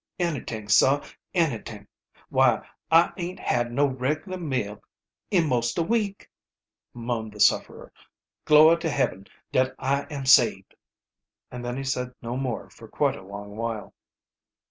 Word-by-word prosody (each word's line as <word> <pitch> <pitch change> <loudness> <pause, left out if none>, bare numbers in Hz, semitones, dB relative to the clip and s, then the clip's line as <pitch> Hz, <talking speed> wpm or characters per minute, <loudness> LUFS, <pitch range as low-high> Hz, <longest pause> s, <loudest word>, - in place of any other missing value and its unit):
"Anyt'ing, 135 -11 -3
sah, 135 +7 +4 0.3
anyt'ing! 115 - -1 0.4
Why, - - +3 0.2
I 165 +1 +5
aint 180 +1 -5
had, 120 0 0
no 140 +4 +2
reg'lar 150 +8 -2
meal 125 - -3 0.5
in 175 -5 +2
most 120 -3 0
a 170 - +2
week!" 205 +1 -1 0.6
moaned 115 -2 -4
the 105 - -12
sufferer. - - +1 0.5
"Glory 155 +2 +7
to 165 - -2
Heaben 115 -10 -1 0.2
dat 130 0 +1
I 140 +1 -1
am 140 -3 -5
sabed!" 130 - +4 0.8
And 125 0 -7
then 120 +1 -4
he 135 - -4
said 125 -2 -3
no 120 +1 -5
more 130 -3 -3
for - - -14
quite - - 0
a - - -10
long, 100 +1 -9
while. 115 -2 -4
130 Hz, 145 wpm, -25 LUFS, 115-155 Hz, 0.8 s, Glory